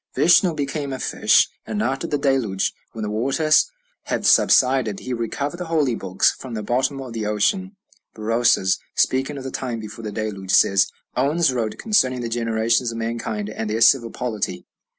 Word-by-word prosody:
Vishnu 175 0 +4
became 140 -1 -3
a 130 - -3
fish; 110 -2 +3 0.2
and 210 - -4
after 135 -6 -2
the 145 - -1
Deluge, 130 -9 0 0.2
when 110 - -5
the 105 - -3
waters 135 - +2 0.4
had - - -2
subsided, 125 -6 +3
he 130 - -4
recovered 140 +7 -3
the 180 - -5
holy 155 -6 +1
books 95 -3 +1
from 125 -3 -9
the 105 - -4
bottom 130 +5 0
of 130 -3 -7
the 110 -2 -3
ocean." 190 - 0 0.4
Berosus, 115 -3 +2 0.2
speaking 135 +3 +1
of 135 - -7
the 130 - -5
time 120 -3 -4
before 110 +1 -9
the 105 - -4
Deluge, 105 -3 -5
says: 95 0 +4 0.3
"Oannes 145 +3 +2
wrote 115 -3 -2
concerning 130 - +1
the 120 - -3
generations 115 +1 0
of 115 - -7
mankind 115 -2 -3
and 110 0 -4
their 110 +2 -2
civil 115 +1 +5
polity." 115 -5 -4
120 Hz, 175 wpm, -22 LUFS, 110-135 Hz, 0.4 s, civil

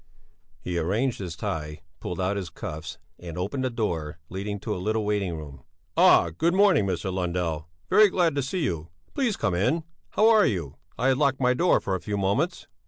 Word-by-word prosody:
He 90 -1 -2
arranged 110 +10 0
his 90 -4 -5
tie, 75 -7 -4 0.2
pulled 90 - -5
out 95 +2 0
his 95 -4 -4
cuffs 80 +1 -7 0.2
and 85 -2 -8
opened 105 +9 -2
the 130 - +1
door 85 -11 -2
leading 100 +2 -4
to - - -2
a 90 - -4
little 110 +2 0
waiting 100 -5 -1
room. 75 -3 -10 0.3
"Ah! 85 - +6
Good 170 - +2
morning, 190 - +4
Mr. 95 +1 -2
Lundell! 85 -3 -2 0.2
Very 215 - +6
glad 175 -4 +2
to 140 - 0
see 155 +7 -2
you! 85 - -2 0.2
Please 250 -7 0
come 105 -5 0
in! 130 - +1 0.3
How 215 - +4
are 220 -2 +6
you? 85 -9 -3 0.2
I 125 +3 +2
had 130 0 +2
locked 140 -3 +2
my 125 -1 +3
door 175 +7 +3
for 95 - -3
a 95 - -1
few 100 +4 -3
moments." 120 - 0
100 Hz, 200 wpm, -26 LUFS, 85-135 Hz, 0.3 s, Ah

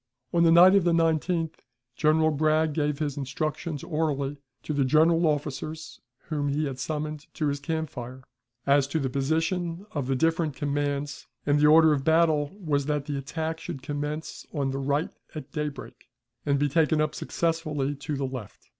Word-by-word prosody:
On 170 - +3
the 165 -1 +6
night 180 +3 +8
of 200 -2 +5
the 170 -1 +3
19th 165 0 +1 0.4
General 155 +2 +3
Bragg 155 +1 +2
gave 150 -1 0
his 145 -2 -2
instructions 150 +2 -3
orally, 145 -3 -2 0.2
to 155 - -3
the 140 -1 +2
general 160 +5 +4
officers 155 +1 -3 0.3
whom 145 -2 -1
he 145 +2 0
had 135 -2 -5
summoned 150 +1 -4
to 155 - -1
his 140 0 -2
camp 160 +2 -3
fire, 125 +1 -8 0.4
as 140 0 +4
to 160 +3 -1
the 135 -3 -2
position 165 +6 -1
of 145 -4 -3
the 135 - +1
different 160 0 +1
commands; 145 0 -2 0.2
and 145 0 +3
the 150 - +5
order 160 0 +7
of 140 -2 -1
battle 160 -2 +3
was 145 -6 0
that 150 -2 -1
the 145 - -3
attack 160 +4 -3
should 135 -4 -7
commence 150 +2 -4
on 140 -4 -1
the 135 - -3
right 140 +3 0 0.2
at 155 - -7
daybreak, 150 -2 -6 0.4
and 140 0 +3
be 145 +1 +2
taken 155 +1 +2
up 155 0 +1
successively 155 -4 -1
to 145 +1 -4
the 135 0 -2
left. 130 -6 -8
150 Hz, 180 wpm, -27 LUFS, 140-160 Hz, 0.4 s, night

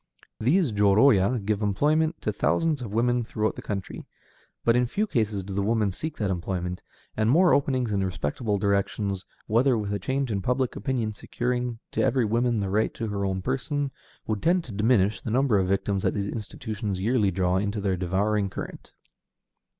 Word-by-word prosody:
These 145 - +2
jōrōya 105 +1 +4
give 105 0 0
employment 155 - +1
to - - 0
thousands 160 -4 +1
of 115 -5 -5
women 120 +2 +1
throughout 110 -1 -1
the - - -7
country, 100 -3 -5 0.6
but 115 - +4
in 125 0 +3
few 210 - 0
cases 110 - -1
do 95 +1 -7
the 100 - 0
women 105 -1 +1
seek 155 - -5
that 100 -3 -1
employment, 90 0 -3 0.3
and 110 +1 +1
more 170 +6 +5
openings 130 -5 +1
in 100 -1 +1
respectable 95 - -2
directions, 100 -1 -1 0.2
together 120 +3 +3
with 105 -2 -2
a 100 - -1
change 130 +5 -1
in 100 -2 -1
public 125 +4 0
opinion 115 -1 -2
securing 120 +2 -2
to - - 0
every 130 -3 +2
woman 115 0 +1
the 100 - -2
right 110 +2 +1
to 115 -2 -3
her 100 -1 -2
own 95 -1 -1
person, 135 - -1 0.3
would 105 -2 -2
tend 175 +1 +2
to 125 - -10
diminish 105 -1 +2
the - - -5
number 125 -3 +3
of 95 - +1
victims 100 0 0
that - - 0
these 100 -1 -1
institutions 105 -2 -4
yearly 110 0 +2
draw 90 0 +1
into 100 +2 -1
their 100 -2 0
devouring 100 +3 0
current. - - -8
110 Hz, 185 wpm, -26 LUFS, 100-125 Hz, 0.6 s, more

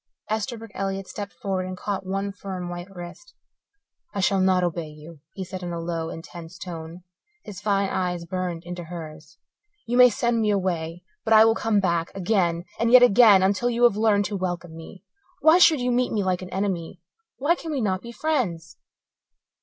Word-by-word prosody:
Esterbrook 220 0 -3
Elliott 195 0 -3
stepped 205 -1 -6
forward 190 -2 -3
and 185 0 -6
caught 200 0 -3
one 195 +1 -2
firm, 190 -3 -6
white 175 +2 -7
wrist. 180 - -11 0.8
"I - - -1
shall 195 0 +2
not 185 -1 +3
obey 170 -2 -2
you," 150 +1 -13
he 190 - -5
said 185 0 -7
in 175 -1 -5
a 170 - -4
low, 165 -1 -3
intense 165 +1 -9
tone; 170 -1 -8 0.4
his 205 -3 -9
fine 200 -2 +1
eyes 180 -2 -2
burned 175 -1 -4
into 175 0 -6
hers. 160 -2 -9 0.5
"You 240 +2 -1
may 250 0 +9
send 235 +1 0
me 215 - +1
away, 175 -4 -1 0.2
but 225 - +2
I 220 0 +8
will 225 - +4
come 225 -2 +1
back, 170 -3 0
again 180 -3 0
and 230 +1 +2
yet 250 0 +9
again 215 -4 +7
until 200 +5 +1
you 240 0 0
have 240 -4 +6
learned 210 -2 +2
to 205 - -3
welcome 175 -3 -4
me. 165 +3 -11 0.4
Why 320 +3 +6
should 320 -5 +6
you 250 0 0
meet 245 +1 +1
me 210 -2 0
like 185 -1 0
an 185 - -8
enemy? 190 -4 -3 0.4
Why 290 +5 +2
can 330 -2 -6
we 285 - -1
not 190 -5 0
be 235 - -9
friends?" 230 - -2
190 Hz, 195 wpm, -24 LUFS, 175-220 Hz, 0.8 s, may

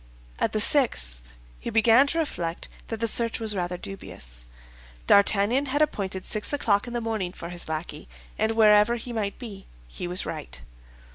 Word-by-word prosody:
At - - +1
the 215 - -1
sixth 60 - +1 0.3
he - - -5
began 225 +5 +5
to 330 - -1
reflect 175 - -3 0.2
that 225 - -5
the 230 - 0
search 230 +1 +2
was 220 -2 -1
rather 180 -1 -2
dubious. 90 - -9 0.6
D'Artagnan 205 +7 +4
had 290 +3 +2
appointed 190 -9 -2
six 215 - -2
o'clock 225 -6 +1
in 240 - -6
the 240 - -1
morning 220 -6 -2
for 170 - -8
his 175 -2 -4
lackey, 155 - -5 0.3
and 220 - 0
wherever 215 +1 +5
he 240 +1 -7
might 205 -3 -2
be, 205 -6 -9 0.2
he - - -6
was 180 +1 0
right. 60 +1 -6
210 Hz, 170 wpm, -26 LUFS, 175-230 Hz, 0.6 s, began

